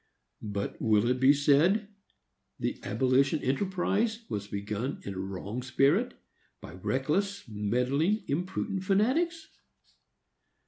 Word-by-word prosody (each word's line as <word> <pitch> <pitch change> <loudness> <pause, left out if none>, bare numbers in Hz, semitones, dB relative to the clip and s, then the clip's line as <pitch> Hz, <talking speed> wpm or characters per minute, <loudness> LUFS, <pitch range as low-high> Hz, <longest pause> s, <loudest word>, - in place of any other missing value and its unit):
But 100 0 -4
will 110 0 +3
it 125 - 0
be 130 +2 +6
said. 150 +9 +3 0.7
"The - - -2
abolition 130 +6 +1
enterprise 200 - 0
was 100 -1 -3
begun 105 +6 -4
in 100 - -5
a 95 - -6
wrong 100 +5 -5
spirit, 140 - +2 0.4
by 75 - -10
reckless, 155 - -1
meddling, 125 - 0
impudent 185 +5 -2
fanatics"? 280 - +1
140 Hz, 105 wpm, -29 LUFS, -, 0.7 s, be